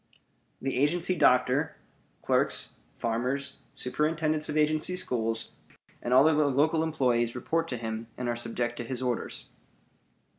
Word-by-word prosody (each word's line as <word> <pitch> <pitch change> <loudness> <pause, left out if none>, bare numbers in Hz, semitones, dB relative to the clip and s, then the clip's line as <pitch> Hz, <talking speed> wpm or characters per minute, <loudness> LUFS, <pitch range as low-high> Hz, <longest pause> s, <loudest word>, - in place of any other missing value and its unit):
The 135 -1 -2
agency 170 +6 +2
doctor, 130 0 +3 0.5
clerks, - - +2 0.2
farmers, 130 +4 -2 0.2
superintendents 155 +3 0
of 150 - -1
agency 155 +4 +2
schools, 115 -9 -1 0.5
and 120 - -3
all 130 +4 +7
other 155 -1 +4
local 150 +4 +2
employees 125 -7 +1
report 165 +6 -1
to 125 - -3
him 110 0 -4
and 125 - -3
are 120 - 0
subject 120 0 -3
to 120 - -3
his 130 +1 -4
orders. 125 -2 -3
130 Hz, 135 wpm, -28 LUFS, 120-155 Hz, 0.5 s, all